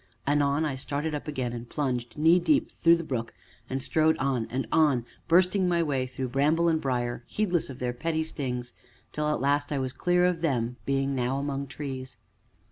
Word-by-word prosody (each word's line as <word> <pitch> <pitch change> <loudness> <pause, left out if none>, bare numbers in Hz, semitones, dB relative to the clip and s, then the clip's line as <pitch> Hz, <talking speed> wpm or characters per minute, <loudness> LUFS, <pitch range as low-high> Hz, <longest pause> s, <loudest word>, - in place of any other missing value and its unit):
Anon 145 +1 +2
I 150 - -1
started 145 +4 -3
up 150 - -4
again, 130 -5 -2
and 120 0 -7
plunged, 125 -5 -2
knee 165 +4 +5
deep, 290 - +2
through 170 0 +4
the 170 - -4
brook, 120 -6 -4 0.3
and 135 0 -2
strode 160 0 +3
on 130 -4 0
and 130 +2 -2
on, 145 -7 +3 0.2
bursting 185 +2 +4
my 170 -1 +2
way 135 -4 -1
through 130 0 -4
bramble 150 +6 +2
and 160 -1 +2
briar, 120 -2 -1
heedless 180 -8 0
of 130 - -7
their 125 -1 -2
petty 160 +5 -1
stings, 125 -6 -4 0.4
till 150 0 0
at 150 - 0
last 145 +1 +1
I 145 - 0
was 130 -1 -2
clear 180 0 +2
of 180 -2 +1
them, 125 -6 0
being 135 0 +1
now 130 +1 0
among 140 0 -3
trees. 130 -1 -6
140 Hz, 195 wpm, -27 LUFS, 130-160 Hz, 0.4 s, knee